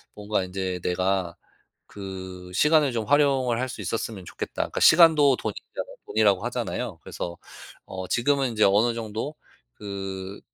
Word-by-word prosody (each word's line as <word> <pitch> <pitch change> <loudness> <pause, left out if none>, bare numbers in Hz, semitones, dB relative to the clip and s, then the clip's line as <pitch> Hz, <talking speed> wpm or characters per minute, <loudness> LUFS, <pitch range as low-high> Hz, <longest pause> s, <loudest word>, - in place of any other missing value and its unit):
뭔가 105 -1 -1
인제 95 0 -3
'내가 90 -1 0 0.9
그 90 -1 -10
시간을 150 - +4
좀 115 -2 -2
활용을 135 -4 +3
할 130 - -1
수 - - -7
있었으면 110 -4 -3
좋겠다.' - - -7
그러니까 - - -3
시간도 155 -5 +7
돈이잖아요 - - -6
돈이라고 105 -4 +2
하잖아요? - - -3
그래서 85 0 -6 0.5
어 95 -1 -6
지금은 135 +1 +1
인제 110 -2 +2
어느 105 +5 +4
정도 115 +5 -4 0.4
그 95 -1 -6
105 Hz, 325 characters per minute, -25 LUFS, 95-130 Hz, 0.9 s, 시간도